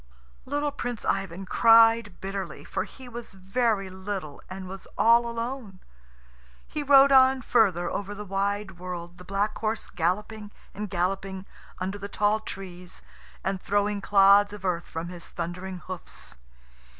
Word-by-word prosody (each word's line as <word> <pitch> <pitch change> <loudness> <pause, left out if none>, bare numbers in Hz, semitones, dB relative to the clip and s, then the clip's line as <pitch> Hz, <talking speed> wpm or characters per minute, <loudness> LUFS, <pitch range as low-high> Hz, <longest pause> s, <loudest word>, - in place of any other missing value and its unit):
Little 290 +2 0
Prince 245 -5 -5
Ivan 195 -1 -1
cried 225 -1 +5
bitterly, 195 0 -5
for - - -3
he 260 -1 -13
was 240 -3 -8
very 195 +1 0
little 190 -5 -6
and 185 0 -7
was 190 +1 -9
all 235 +1 +5
alone. 235 -3 -5 0.9
He 300 - -4
rode 280 -1 +7
on 260 -1 +6
further 195 -8 +3
over 205 +1 -4
the 210 +1 -7
wide 195 -1 -2
world, 175 -1 -7
the - - -10
black 200 +3 -1
horse 220 0 -2
galloping 205 +5 -2 0.2
and 210 0 -5
galloping 190 +1 -2 0.3
under 190 +2 -3
the 200 0 -6
tall 210 +1 +2
trees, 180 -4 -8 0.4
and 190 -1 -2
throwing 205 +1 0
clods 200 +1 +5
of 200 -2 -8
earth 175 -2 0
from 165 +2 -5
his 175 -1 -9
thundering 180 +2 -5
hoofs. 185 -1 -9
200 Hz, 145 wpm, -27 LUFS, 185-225 Hz, 0.9 s, rode